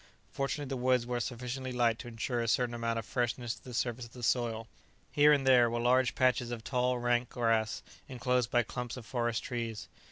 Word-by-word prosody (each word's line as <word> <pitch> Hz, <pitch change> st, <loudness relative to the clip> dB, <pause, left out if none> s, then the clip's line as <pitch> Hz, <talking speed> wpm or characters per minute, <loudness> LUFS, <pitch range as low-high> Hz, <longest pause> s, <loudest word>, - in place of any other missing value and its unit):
Fortunately 140 Hz, +1 st, -2 dB
the 135 Hz, 0 st, -3 dB
woods 125 Hz, -1 st, +3 dB
were 120 Hz, 0 st, -2 dB
sufficiently 125 Hz, +2 st, -4 dB
light 120 Hz, -2 st, +1 dB
to -, -, -8 dB
ensure 120 Hz, +1 st, -2 dB
a 115 Hz, -, -2 dB
certain 120 Hz, +1 st, +1 dB
amount 115 Hz, -1 st, -1 dB
of 115 Hz, -, -3 dB
freshness 120 Hz, 0 st, -1 dB
to -, -, -15 dB
the 125 Hz, -, -9 dB
surface 120 Hz, 0 st, -1 dB
of 115 Hz, -, -15 dB
the 125 Hz, -, -10 dB
soil. 115 Hz, -2 st, 0 dB, 0.4 s
Here 150 Hz, +1 st, +6 dB
and 140 Hz, -2 st, +3 dB
there 125 Hz, -3 st, +6 dB
were 120 Hz, +1 st, -2 dB
large 125 Hz, +1 st, +3 dB
patches 125 Hz, -1 st, +2 dB
of 120 Hz, -2 st, -5 dB
tall, 125 Hz, +1 st, 0 dB
rank 120 Hz, 0 st, +1 dB
grass 115 Hz, -2 st, 0 dB, 0.3 s
enclosed 125 Hz, -2 st, 0 dB
by 120 Hz, -, +3 dB
clumps 125 Hz, +2 st, -5 dB
of 120 Hz, -, -9 dB
forest 120 Hz, -1 st, -1 dB
trees. 115 Hz, -6 st, -4 dB
120 Hz, 210 wpm, -31 LUFS, 115-125 Hz, 0.4 s, Here